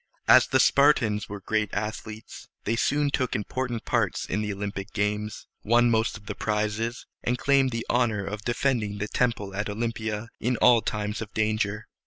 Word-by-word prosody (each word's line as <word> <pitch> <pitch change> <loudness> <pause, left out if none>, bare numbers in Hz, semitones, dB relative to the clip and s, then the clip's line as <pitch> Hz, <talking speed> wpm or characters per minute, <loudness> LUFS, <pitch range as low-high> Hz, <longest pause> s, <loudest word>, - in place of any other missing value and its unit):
As - - +7
the - - +2
Spartans 120 -7 +3
were 100 0 -6
great 110 +1 -1
athletes, 110 +1 -6 0.2
they 115 - 0
soon 145 +4 +1
took 130 -3 0
important 120 +2 -3
parts - - 0
in 105 - -2
the 105 -1 -2
Olympic 100 0 -5
games, 105 +1 -2 0.2
won 120 +2 +4
most 110 -2 +1
of 100 - -18
the - - -4
prizes, 105 +2 -2 0.2
and 125 +1 0
claimed 135 0 +3
the 115 -2 -4
honor 115 -5 +1
of 105 +1 -5
defending 120 -3 0
the 105 +1 -3
temple 105 -5 -1
at 105 +1 -2
Olympia 110 0 -3
in 125 +1 0
all 120 -1 +6
times 105 +1 -3
of 110 -1 -6
danger. 110 -1 0
110 Hz, 175 wpm, -26 LUFS, 105-120 Hz, 0.2 s, As